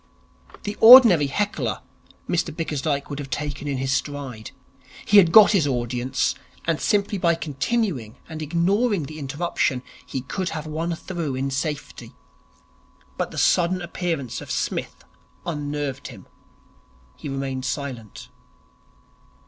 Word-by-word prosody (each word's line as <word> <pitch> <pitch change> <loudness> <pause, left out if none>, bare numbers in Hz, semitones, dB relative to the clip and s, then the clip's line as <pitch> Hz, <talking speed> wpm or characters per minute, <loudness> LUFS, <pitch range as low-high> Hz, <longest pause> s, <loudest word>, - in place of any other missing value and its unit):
The 205 - -4
ordinary 225 - +9
heckler 205 +9 -2 0.4
Mr 175 0 0
Bickersdyke 150 -3 -2
would 140 - -4
have 140 -2 -6
taken 145 +2 -4
in 140 -2 -1
his 135 +1 -2
stride. 135 -6 -3 0.6
He 210 - +5
had 175 -4 +4
got 215 +3 +8
his 185 -9 +2
audience, 125 0 -1 0.3
and 165 -2 0
simply 205 -1 +1
by 170 -1 +3
continuing 155 - -2
and 160 -1 -7
ignoring 185 +5 +1
the 155 +3 -8
interruption, 140 -2 -1 0.2
he 130 - -5
could 180 +8 -3
have 155 - -6
won 165 +2 -3
through 165 -6 -4
in 135 +1 -2
safety. 145 +2 -4 1.0
But - - -2
the - - -10
sudden 180 +1 +2
appearance 170 -7 -4
of - - -10
Psmith - - -3 0.4
unnerved 145 -3 -4
him. 110 -8 -12 0.9
He - - -7
remained 135 -1 -4
silent. 125 -5 -5
150 Hz, 130 wpm, -23 LUFS, 135-175 Hz, 1.0 s, ordinary